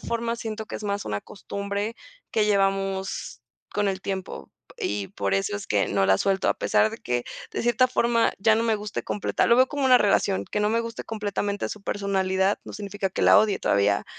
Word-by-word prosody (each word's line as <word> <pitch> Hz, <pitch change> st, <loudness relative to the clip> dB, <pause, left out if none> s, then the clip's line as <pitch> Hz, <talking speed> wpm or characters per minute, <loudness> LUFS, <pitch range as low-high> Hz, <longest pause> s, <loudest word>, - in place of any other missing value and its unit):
forma, 235 Hz, 0 st, -2 dB
siento 220 Hz, -1 st, -5 dB
que -, -, -5 dB
es 215 Hz, -, -8 dB
más 200 Hz, 0 st, -2 dB
una 105 Hz, -1 st, -2 dB
costumbre, 200 Hz, +2 st, -4 dB, 0.4 s
que 215 Hz, -, +2 dB
llevamos 195 Hz, -, 0 dB, 0.3 s
con 205 Hz, -1 st, +1 dB
el 190 Hz, -1 st, -2 dB
tiempo. 190 Hz, -, -5 dB, 0.3 s
Y 100 Hz, -1 st, -2 dB
por 100 Hz, -1 st, -2 dB
eso 95 Hz, +1 st, 0 dB
es -, -, -7 dB
que 100 Hz, -1 st, +1 dB
no 95 Hz, -1 st, +2 dB
la 95 Hz, -, +5 dB
suelto, 195 Hz, -, +1 dB
a -, -, +3 dB
pesar 215 Hz, -, +2 dB
de 225 Hz, -, -7 dB
que, 120 Hz, -, -2 dB, 0.3 s
de -, -, -3 dB
cierta 240 Hz, +1 st, +3 dB
forma, 235 Hz, -2 st, +2 dB
ya 220 Hz, +2 st, +4 dB
no 225 Hz, -, +1 dB
me 225 Hz, -2 st, +2 dB
guste 210 Hz, 0 st, -5 dB
completa 205 Hz, -, 0 dB
Lo 235 Hz, -, +5 dB
veo 255 Hz, -, +6 dB
como 285 Hz, 0 st, -2 dB
una 255 Hz, -1 st, +7 dB
relación. 200 Hz, -1 st, +2 dB
Que 210 Hz, -, -1 dB
no 210 Hz, +1 st, +2 dB
me 230 Hz, +1 st, +2 dB
guste 230 Hz, 0 st, -6 dB
completamente 205 Hz, -2 st, -2 dB
su 210 Hz, -, -7 dB
personalidad, 195 Hz, -1 st, 0 dB
no -, -, -9 dB
significa 200 Hz, -2 st, -4 dB
que -, -, -4 dB
la -, -, +7 dB
odie. 215 Hz, -2 st, +2 dB
Todavía 100 Hz, 0 st, +2 dB
200 Hz, 210 wpm, -25 LUFS, 190-220 Hz, 0.4 s, una